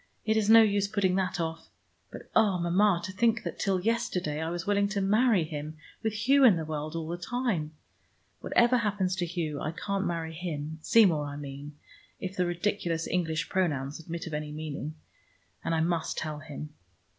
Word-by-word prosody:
"It 220 Hz, 0 st, +2 dB
is 215 Hz, -1 st, +2 dB
no 225 Hz, 0 st, +9 dB
use 205 Hz, -2 st, +2 dB
putting 200 Hz, -3 st, +1 dB
that 190 Hz, 0 st, -1 dB
off. 165 Hz, -1 st, -4 dB, 0.4 s
But, -, -, -9 dB
oh, 200 Hz, -4 st, +4 dB
Mama, 175 Hz, +2 st, +3 dB
to 185 Hz, -, -4 dB
think 225 Hz, +3 st, +1 dB
that -, -, -5 dB
till 195 Hz, -2 st, +1 dB
yesterday 180 Hz, -7 st, -1 dB
I 160 Hz, -, -2 dB
was 175 Hz, 0 st, -4 dB
willing 200 Hz, 0 st, +2 dB
to 200 Hz, 0 st, -2 dB
marry 210 Hz, 0 st, +3 dB
him, 155 Hz, 0 st, -6 dB, 0.2 s
with 220 Hz, 0 st, -2 dB
Hugh 275 Hz, +1 st, +6 dB
in 230 Hz, -7 st, +8 dB
the 160 Hz, -1 st, -3 dB
world 155 Hz, +1 st, -4 dB
all 165 Hz, -1 st, -3 dB
the 170 Hz, +1 st, -4 dB
time. 190 Hz, -7 st, -2 dB, 0.7 s
Whatever 240 Hz, +1 st, +3 dB
happens 205 Hz, -5 st, 0 dB
to 175 Hz, -1 st, -1 dB
Hugh, 160 Hz, -4 st, -3 dB
I 155 Hz, -, -2 dB
can't 200 Hz, +3 st, -2 dB
marry 165 Hz, -1 st, -3 dB
him, 160 Hz, -2 st, -5 dB
Seymour, 170 Hz, -8 st, +4 dB
I 145 Hz, -, -6 dB
mean, 145 Hz, +1 st, -8 dB, 0.4 s
if 190 Hz, 0 st, -5 dB
the 180 Hz, -2 st, +1 dB
ridiculous 175 Hz, -2 st, -1 dB
English 165 Hz, -2 st, -1 dB
pronouns 150 Hz, -6 st, -1 dB
admit 165 Hz, +1 st, -6 dB
of 165 Hz, -, -7 dB
any 150 Hz, 0 st, -3 dB
meaning; 155 Hz, 0 st, -5 dB, 0.7 s
and 165 Hz, -, 0 dB
I 160 Hz, -, +1 dB
must 165 Hz, 0 st, -1 dB
tell 155 Hz, -1 st, -3 dB
him." 150 Hz, 0 st, -8 dB
175 Hz, 190 wpm, -29 LUFS, 155-205 Hz, 0.7 s, no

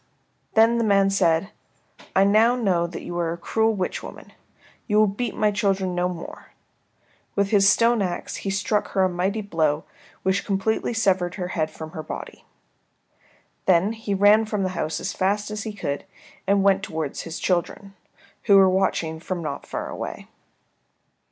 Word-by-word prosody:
Then 225 Hz, +1 st, +5 dB
the -, -, +1 dB
man 195 Hz, -2 st, +3 dB
said, 185 Hz, 0 st, +2 dB, 0.6 s
"I 190 Hz, -, +6 dB
know 220 Hz, +4 st, +4 dB
now 185 Hz, -8 st, +1 dB
that 170 Hz, -, -8 dB
you 175 Hz, -, -6 dB
are 165 Hz, -1 st, 0 dB
a -, -, -7 dB
cruel 220 Hz, +5 st, +1 dB
witch 185 Hz, -2 st, -2 dB
woman. -, -, -11 dB, 0.5 s
You 210 Hz, -2 st, +2 dB
will 215 Hz, -, +6 dB
beat 210 Hz, +5 st, -3 dB
my 210 Hz, -1 st, +2 dB
children 195 Hz, -3 st, 0 dB
no 175 Hz, 0 st, 0 dB
more." 170 Hz, -2 st, -9 dB, 0.8 s
With 200 Hz, -1 st, +1 dB
his 195 Hz, -2 st, +5 dB
stone 230 Hz, 0 st, +3 dB
axe 180 Hz, -3 st, -3 dB
he 195 Hz, -, -4 dB
struck 205 Hz, +2 st, 0 dB
her 190 Hz, -, +3 dB
a 185 Hz, -, +3 dB
mighty 190 Hz, +4 st, -1 dB
blow 160 Hz, -6 st, 0 dB, 0.4 s
which 190 Hz, +1 st, +1 dB
completely 220 Hz, +4 st, -1 dB
severed 185 Hz, -5 st, +1 dB
her 180 Hz, -3 st, -4 dB
head 155 Hz, -3 st, -1 dB
from 155 Hz, 0 st, -9 dB
her 160 Hz, -, -6 dB
body. -, -, -8 dB, 1.2 s
Then 190 Hz, +3 st, +4 dB
he 220 Hz, -3 st, -3 dB
ran 205 Hz, +3 st, +5 dB
from 210 Hz, -2 st, -2 dB
the 185 Hz, -, 0 dB
house 165 Hz, -3 st, -3 dB
as 190 Hz, -, -3 dB
fast 205 Hz, +2 st, 0 dB
as 215 Hz, 0 st, -4 dB
he 220 Hz, -, -3 dB
could 145 Hz, -7 st, -4 dB, 0.4 s
and 200 Hz, 0 st, +3 dB
went 195 Hz, -1 st, +4 dB
towards 160 Hz, -6 st, -4 dB
his 165 Hz, 0 st, -6 dB
children, 190 Hz, +2 st, -2 dB, 0.5 s
who 200 Hz, -, +6 dB
were 190 Hz, -1 st, +7 dB
watching 185 Hz, -4 st, 0 dB
him 180 Hz, 0 st, -4 dB
not 140 Hz, -2 st, -5 dB
far -, -, -4 dB
away. -, -, -6 dB
195 Hz, 175 wpm, -24 LUFS, 175-210 Hz, 1.2 s, were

